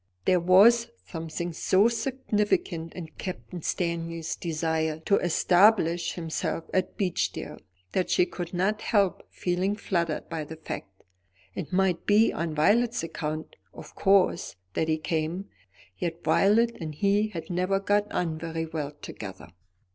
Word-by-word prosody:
There 185 -1 +4
was 200 +7 +6 0.2
something 165 - -5
so 190 +6 +3
significant 215 - -1
in 170 -3 -7
Captain 185 -1 -6
Winstanley's 165 -1 -2
desire 160 -1 -1
to 200 +4 +3
establish 175 0 +3
himself 165 -1 -3
at 185 -1 0
Beechdale, 185 -4 -2 0.3
that 185 - 0
she 180 - +4
could 175 -1 -6
not 190 +4 0
help 200 -5 +2
feeling 185 +3 -1
fluttered 170 -6 -1
by 160 -2 -4
the 160 +2 -8
fact. 100 -11 -8 0.5
It - - -6
might 185 -2 +1
be 210 +2 +5
on 165 -2 -3
Violet's 225 +8 +3
account, 155 -1 -4 0.2
of - - -11
course, 195 - +2 0.2
that 160 - 0
he 155 -1 +2
came; 160 +4 -2 0.5
yet 170 -1 -3
Violet 230 +4 +3
and 155 -2 -5
he 205 +5 +2
had 165 -5 -7
never 185 +2 +1
got 205 +1 +1
on 160 -3 -1
very 165 0 -3
well 155 -3 -4
together. - - -8
175 Hz, 140 wpm, -27 LUFS, 160-200 Hz, 0.5 s, was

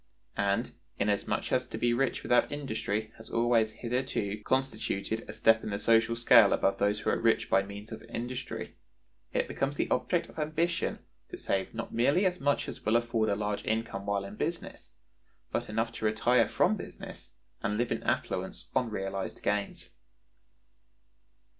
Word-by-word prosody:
And, 100 +4 +1 0.3
inasmuch 100 0 0
as - - +1
to - - -6
be 120 0 +2
rich 135 +2 0
without 120 - +3
industry 110 -6 -2
has 110 - -12
always 115 -2 +3
hitherto 115 -4 -2
constituted 110 -4 -1
a - - -2
step 110 0 +4
in - - -3
the 100 - -1
social 115 +2 +3
scale 115 -3 +7
above 95 - +1
those 105 +1 +1
who - - +1
are - - 0
rich 115 -1 +2
by 95 - +5
means 100 +2 -9
of 110 - -7
industry, 120 +2 -5 0.6
it - - 0
becomes 140 +1 -2
the - - +1
object 125 +8 +1
of - - -10
ambition 160 +3 0 0.3
to - - -7
save 95 +3 -2
not 115 - -5
merely 140 - +3
as 180 -1 +1
much 145 0 +1
as - - -7
will 110 - +2
afford 120 -2 +2
a 100 - +2
large 105 0 -2
income 110 -3 -2
while 100 -1 0
in 100 +2 -9
business, 170 +1 -4 0.5
but - - -2
enough 115 +2 0
to 110 - -5
retire 115 +2 +3
from - - +3
business 85 - -9 0.3
and 105 -1 -1
live 120 +1 0
in - - -1
affluence - - -2
on 125 - +2
realized 95 -2 -4
gains. 105 -1 -1
115 Hz, 170 wpm, -30 LUFS, 105-125 Hz, 0.6 s, scale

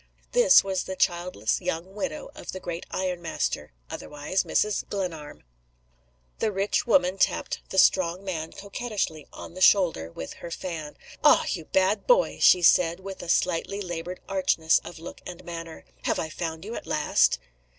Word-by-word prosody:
This - - +7
was 190 -1 -2
the 190 - -5
childless 175 - 0
young 170 +4 -3
widow 280 +7 -4
of - - -8
the 190 - -5
great 170 -1 -6
ironmaster 175 - -2 0.2
otherwise, 150 - -3
Mrs. 210 -1 +1
Glenarm. 165 -7 -5 1.0
The 220 - +1
rich 200 +4 0
woman 195 -7 +3
tapped - - +1
the 190 - -5
strong 185 -1 +4
man 165 -5 -4
coquettishly 200 - -4
on - - -10
the 185 - -9
shoulder 170 - +4
with 80 - -7
her 170 - -6
fan. 165 -3 -6 0.3
"Ah! - - +6
you 160 - -3
bad 190 +5 +1
boy!" - - +3
she 180 - +6
said, 170 0 +5
with 190 0 -8
a 175 - -8
slightly 180 +3 +1
labored 175 -1 -5
archness 185 -4 +2
of 175 - -9
look 165 +2 -10
and 180 -1 -9
manner. 165 -1 -8 0.2
"Have - - +1
I 160 - -3
found 160 +1 -5
you 220 - -6
at - - -7
last?" 150 - +3
180 Hz, 160 wpm, -26 LUFS, 165-195 Hz, 1.0 s, This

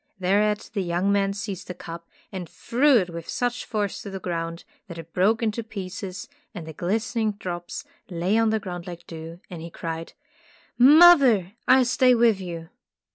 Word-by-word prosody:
Thereat 205 +3 +1
the 200 - -1
young 180 +2 0
man 200 -1 +2
seized 200 -2 -6
the 180 - -6
cup 170 -1 -9 0.2
and 180 -4 -6
threw 265 +3 +3
it 180 -5 0
with 170 -1 -8
such 245 0 -2
force 205 -3 -2
to 200 - -7
the 190 0 -6
ground 170 -2 -4 0.2
that 170 -3 -9
it 165 0 -10
broke 220 +6 +2
into 225 +1 -1
pieces, 195 -3 -7 0.3
and 170 -4 -6
the 160 - -8
glistening 220 - -1
drops 180 +5 -6 0.3
lay 180 +3 0
on 225 0 +3
the 220 0 +1
ground 175 -3 -7
like 175 -1 -8
dew, 165 +1 -9
and 170 -2 -7
he 170 - -7
cried: 165 0 -6 0.7
''Mother, 270 - +7
I'll 260 -1 +6
stay 250 0 +4
with 230 -4 +3
you!" 165 -3 -7
195 Hz, 180 wpm, -24 LUFS, 175-225 Hz, 0.7 s, Mother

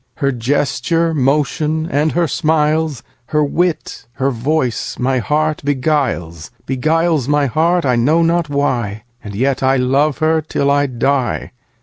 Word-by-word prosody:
Her 140 -2 0
gesture, 145 +6 0
motion, 150 +3 0
and 150 +1 0
her 170 -1 +1
smiles, 155 -3 0 0.3
5 - - -22
Her 150 0 +3
wit, 165 -5 -2
her 135 +3 0
voice 130 0 -1
my 130 +1 0
heart 155 +4 0
beguiles, 125 - -1 0.2
Beguiles 155 +1 +1
my 145 0 +2
heart, 165 +6 +1
I 125 -2 +2
know 155 +8 +3
not 165 -1 +1
why, 120 -7 -1 0.2
And 105 -1 -8
yet 130 +4 0
I 135 0 +3
love 135 +3 +1
her 160 0 +2
till 140 -2 -1
I 145 0 +2
die. 130 +1 -1
145 Hz, 145 wpm, -17 LUFS, 130-155 Hz, 0.3 s, Her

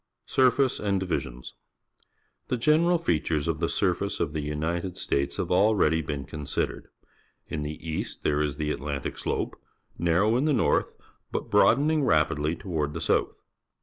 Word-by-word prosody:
Surface 130 0 +3
and 100 -2 0
Divisions. 65 -9 -4 0.5
— - - -43
The 125 - -1
general 160 +7 +4
fea 125 - +1
tures 75 -1 -1
of 80 -2 -1
the - - 0
surface - - 0
of 75 - -1
the 75 -2 -3
Ignited 85 +4 -2
States 70 0 -1
have - - -2
already 90 -4 +3
been 70 -2 -4
considered. 75 0 -3 0.6
In 75 - -4
the 75 +1 -4
east 80 - -4
there 75 0 +1
is 75 -1 -1
the 75 -1 -1
Atlantic 70 +1 -3
Slope, - - -3 0.4
narrow 90 +7 +3
in 135 - +1
the 155 - +3
north, 120 - +2 0.4
but - - -4
broadening 150 +1 +4
rapidly 75 - +2
toward 80 -5 -3
the - - -2
south. - - +1
80 Hz, 160 wpm, -27 LUFS, 75-110 Hz, 0.6 s, general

